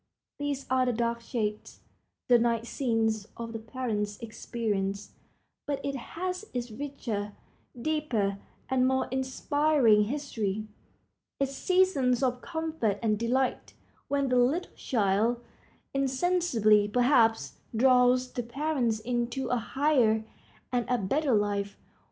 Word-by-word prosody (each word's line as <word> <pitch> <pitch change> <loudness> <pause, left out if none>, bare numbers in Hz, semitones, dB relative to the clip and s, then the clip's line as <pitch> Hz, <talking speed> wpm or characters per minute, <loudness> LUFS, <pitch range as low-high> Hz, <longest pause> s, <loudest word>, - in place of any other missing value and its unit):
These 285 -1 -2
are 255 0 +2
the 250 - +1
dark 235 0 -1
shades, 215 -3 -4 0.5
the 245 -1 +6
night 230 -1 +1
scenes 225 -4 0
of 230 0 -6
the 225 - -4
parents' 220 -3 -3
experience; 210 -3 -3 0.6
but 285 -1 -1
it 280 0 -2
has 365 - -4
its 240 -1 -3
richer, 220 -6 -4 0.5
deeper, 235 -9 -1 0.3
and 255 -1 +2
more 265 0 +1
inspiring 265 -3 +3
history, 220 -6 -3 0.7
its 275 -1 0
seasons 285 -9 +2
of 250 -1 0
comfort 320 - -2
and 215 -2 +1
delight, 255 +3 -1 0.3
when 280 -1 0
the 250 - +3
little 275 +9 +1
child, 220 0 +1 0.5
insensibly, 265 - +2
perhaps, 230 0 +2 0.2
draws 250 +1 +4
the 245 - -2
parents 245 -2 -1
into 240 +2 -2
a 250 - +2
higher 235 -3 +2 0.5
and 245 -1 +1
a 250 - +3
better 260 +6 +1
life. 205 -1 -1
245 Hz, 120 wpm, -29 LUFS, 220-275 Hz, 0.7 s, the